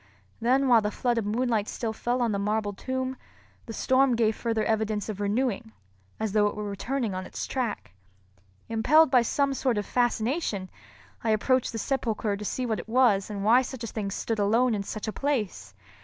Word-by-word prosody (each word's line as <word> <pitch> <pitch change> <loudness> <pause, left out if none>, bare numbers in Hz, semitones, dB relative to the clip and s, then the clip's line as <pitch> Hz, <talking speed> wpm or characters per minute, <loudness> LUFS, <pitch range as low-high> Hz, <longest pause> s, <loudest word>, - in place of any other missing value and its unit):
Then 260 +4 +2
while 235 -3 +6
the 210 - -1
flood 240 +2 0
of 210 - -3
moonlight 225 -1 0
still 225 -2 -3
fell 245 +2 -1
on 235 - +1
the 200 - -1
marble 205 0 -1
tomb, 260 +4 -3 0.5
the - - -5
storm 260 +2 +3
gave 220 -2 +2
further 225 -2 -1
evidence 220 -1 -1
of 205 -2 -5
renewing, 220 +1 -1 0.5
as 220 -2 -1
though 210 0 +3
it - - -3
were 210 - -4
returning 230 +2 -2
on 185 0 -4
its - - -5
track. 235 - -3 0.7
Impelled 255 +7 +4
by 250 - +6
some 275 +4 +1
sort 255 -4 0
of 205 - -1
fascination, 240 - -1 0.5
I 225 - 0
approached 250 +4 +2
the 225 - -5
sepulchre 225 -4 -1
to 205 - -7
see 250 +5 -2
what 220 -5 -1
it 205 - -9
was 225 -5 +3
and 200 -2 -4
why 235 +5 +6
such 260 -2 -6
a - - -3
thing 210 -2 -4
stood 220 +2 -3
alone 230 +4 +3
in 205 - -1
such 215 +2 -5
a 215 - -2
place. 210 - -2
225 Hz, 200 wpm, -27 LUFS, 210-255 Hz, 0.7 s, while